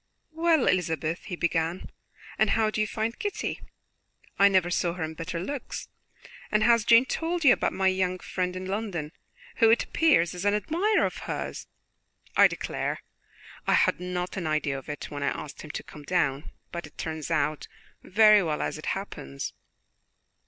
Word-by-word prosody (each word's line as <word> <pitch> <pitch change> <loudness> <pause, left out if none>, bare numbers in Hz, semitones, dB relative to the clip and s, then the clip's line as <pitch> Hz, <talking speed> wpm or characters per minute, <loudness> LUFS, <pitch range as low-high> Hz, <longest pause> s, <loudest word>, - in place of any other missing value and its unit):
"Well, 325 -3 +3
Elizabeth," 165 -2 0
he 185 - -4
began, 170 +1 -1 0.5
"and - - +4
how 220 -1 +2
do 215 - -1
you 215 - +1
find 225 +1 -3
Kitty? 410 -1 -3 0.8
I 200 - +8
never 185 -3 +2
saw 175 -1 +1
her 175 -2 -4
in 160 0 -4
better 165 +1 -5
looks. 270 +8 -5 0.6
And 215 0 +3
has 235 -2 +4
Jane 235 +2 +7
told 335 +4 -2
you 255 - +9
about - - 0
my 190 +1 +1
young 185 -1 +1
friend 180 0 -3
in 185 0 -5
London, 190 -6 -3 0.5
who, 225 - +6
it 230 - +4
appears, 285 - +3
is 180 +1 -6
an 205 0 +3
admirer 345 - +1
of - - -3
hers? - - -4 0.7
I - - +8
declare - - -4 0.6
I - - +4
had - - +3
not 180 +1 -4
an 175 -4 -2
idea 155 -3 0
of 135 - -14
it 150 - -6
when 145 -1 -5
I - - 0
asked 145 -2 -8
him 155 - -10
to - - -5
come 150 - -12
down, 145 -3 0 0.2
but 170 -3 -5
it - - -22
turns 160 -2 -4
out 150 +1 0 0.3
very 215 +1 +6
well 155 -4 -1
as - - -3
it - - -8
happens." 70 - -6
185 Hz, 180 wpm, -27 LUFS, 160-220 Hz, 0.8 s, you